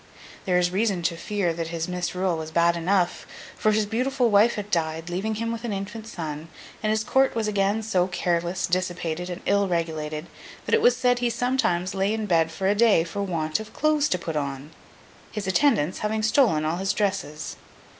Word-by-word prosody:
There 180 -1 +2
is 175 0 +2
reason 195 -2 0
to 170 - 0
fear 180 0 -1
that 165 0 -4
his 165 0 -3
misrule 180 0 -1
was 160 -1 -5
bad 170 +1 +3
enough; 180 +1 0 0.3
for 215 - +2
his 215 0 +2
beautiful 245 +2 0
wife 210 +3 +5
had 210 0 -6
died, 165 0 -1
leaving 205 +5 -2
him 230 +1 -2
with 230 0 -5
an 235 - -3
infant 205 +3 -5
son, 160 -6 -6 0.3
and 215 - 0
his 215 0 +1
court 265 +3 +2
was 225 -2 0
again 205 +1 +1
so 185 -4 +1
careless, 175 0 -1
dissipated, 180 -1 -2
and 175 0 -6
ill 200 0 +2
regulated, 155 -3 -2 0.4
that - - -2
it 455 - +5
was 485 +3 +5
said 245 -1 +2
he 240 -1 +1
sometimes 230 -7 0
lay 195 +2 +1
in 220 -1 -2
bed 165 -4 +3
of 160 +3 -12
a 195 +2 +4
day 210 -5 +4
for 190 +4 -5
want 165 -3 -1
of 220 0 -9
clothes 305 -1 +2
to 180 - +1
put 165 -2 -5
on—his 145 +8 -7
attendants 190 - +2
having 215 +1 -1
stolen 215 - +3
all 160 +2 0
his 195 +1 0
dresses. 190 -7 -2
190 Hz, 195 wpm, -25 LUFS, 170-220 Hz, 0.4 s, wife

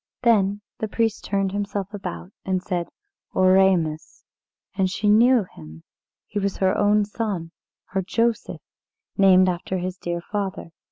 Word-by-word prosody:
Then 205 -3 +3 0.2
the 220 - -2
priest 225 0 -1
turned 195 -1 0
himself 200 0 -3
about, 90 - -6
and 185 -1 -1
said, 175 -3 -2 0.5
"Oremus." 185 -4 +2 0.5
And 190 -1 +1
she 210 +3 -2
knew 235 +3 +5
him 80 - -13 0.4
he 205 - -3
was 200 -1 -2
her 190 -1 +2
own 205 0 +3
son 200 -6 -4 0.4
her 195 - -1
Joseph, 230 +4 -1 0.5
named 185 -1 +6
after 185 +1 -2
his 180 +1 -4
dear 175 0 -3
father. 195 -1 -4
195 Hz, 135 wpm, -23 LUFS, 180-205 Hz, 0.5 s, named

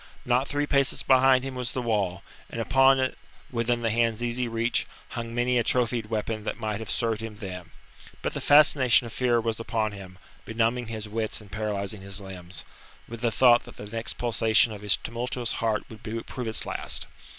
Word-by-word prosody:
Not 125 +2 +2
three 145 0 0
paces 140 -2 +1
behind 130 -1 +5
him 135 0 -4
was 125 -2 -4
the - - -2
wall, 100 -5 -1 0.3
and 115 - -6
on 135 0 +6
it, 130 0 -1 0.3
within 120 0 0
the 115 - +1
hand's 115 0 +1
easy 120 +1 -1
reach, 115 +1 0 0.2
hung 115 -1 -5
many 120 0 +2
a - - +2
trophied 120 -2 +1
weapon 110 0 -2
that 110 - -4
might 105 -2 -2
have 110 - -7
served 115 -2 0
him 115 -1 -6
then. 90 -5 -7 0.5
But - - -1
the - - -4
fascination 140 -4 +6
of 115 - -8
fear 120 -2 +2
was 115 -1 -2
upon 110 -2 -1
him, 95 -2 -10 0.3
benumbing 115 +2 0
his 110 -1 -5
wits 110 +1 -2
and 105 -3 -14
paralysing 105 -1 -3
his 100 +1 -4
limbs, 90 -3 -7 0.4
with 115 0 -8
the 120 - +2
thought 120 +1 +5
that - - -13
the - - -8
next 115 +2 -3
pulsation 115 0 +3
of 105 - -9
his 105 -1 +3
tumultuous 120 +1 -3
heart 110 -2 +1
would 110 -2 -12 0.2
prove 125 -2 -5
its 110 - -1
last. - - -2
115 Hz, 195 wpm, -27 LUFS, 105-125 Hz, 0.5 s, on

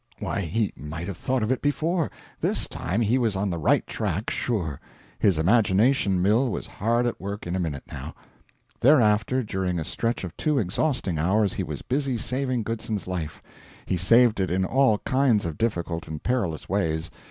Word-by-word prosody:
Why, - - -2
he 100 +5 -1
might 80 +5 -6
have 95 -4 -5
thought 130 +2 0
of 110 - 0
it 130 - 0
before. 160 +3 0 0.3
This - - 0
time 95 +7 -2
he 115 +4 +2
was 115 -5 +1
on 95 0 0
the 85 - -3
right 75 - +3
track, 105 0 -2
sure. 90 - -2 0.4
His 95 -6 +3
imagination 105 - +3
mill 115 +7 +3
was - - -4
hard 120 +3 0
at 120 - -2
work 100 +2 -5
in 90 +1 -2
a - - -1
minute, 75 -6 -3
now. - - -8 0.6
Thereafter, 125 -2 +4
during 95 -4 -2
a - - -2
stretch 115 +8 -2
of 90 - -6
two 150 -2 0
exhausting 105 - 0
hours, 100 +5 +2
he - - -2
was - - -6
busy 135 -1 -1
saving 125 +1 -1
Goodson's 110 -2 -3
life. 85 -5 -5 0.4
He - - 0
saved 115 +5 +4
it 95 - +1
in 95 +2 +1
all 130 -1 +3
kinds 130 -7 +3
of 80 -3 -4
difficult 85 -7 -1
and 75 -1 -6
perilous 100 -11 -1
ways. 80 -4 -1
105 Hz, 185 wpm, -25 LUFS, 90-120 Hz, 0.6 s, Thereafter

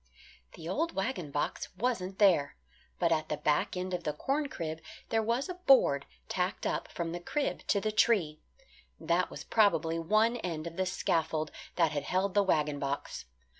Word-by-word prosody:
The 160 - -9
old 320 - -1
wagon 195 - -2
box 145 +1 -2
wasn't 195 -4 -1
there. 175 - +4 0.4
But 170 -1 +1
at 155 -1 +1
the - - -1
back 150 +4 +1
end 185 0 -3
of 175 -1 -2
the 150 - -1
corn 280 - -1
crib 160 -5 -5 0.3
there 225 - +2
was 235 +4 0
a 365 - -4
board 270 - +4 0.2
tacked 185 +2 -2
up - - -1
from 170 -1 -4
the 175 - -4
crib 280 +11 -2
to 200 - +3
the 215 +2 -1
tree. 195 -8 +2 0.6
That 175 +2 +1
was - - -8
probably 165 -7 +2
one 215 +8 +2
end 165 -7 -4
of 170 0 -6
the 185 +1 0
scaffold 160 -4 0 0.2
that 165 -3 +3
had 145 -2 -3
held 190 +1 0
the 205 - +5
wagon 150 -6 +1
box. 140 0 -4
180 Hz, 180 wpm, -31 LUFS, 160-215 Hz, 0.6 s, the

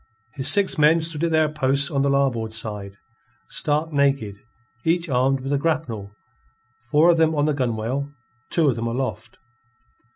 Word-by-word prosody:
His 135 +2 -4
six 190 +2 +2
men 155 +3 +5
stood 160 -1 -2
at - - 0
their 160 -1 +3
posts 140 -1 +1
on 140 -2 0
the 140 - +1
larboard 130 -5 0
side, 105 -3 -3 0.5
stark 150 +2 -1
naked, 140 -8 +1 0.5
each 170 +1 +1
armed 135 +1 +1
with 135 +2 -3
a 140 - +1
grapnel, 140 -11 -2 0.8
four 155 +6 +5
of 165 - +1
them 160 0 +3
on 145 0 +1
the 150 - +1
gunwale, 130 +2 -2 0.4
two 165 -3 +2
of 130 - +2
them 115 0 -2
aloft. 125 +3 -4
140 Hz, 165 wpm, -22 LUFS, 125-155 Hz, 0.8 s, men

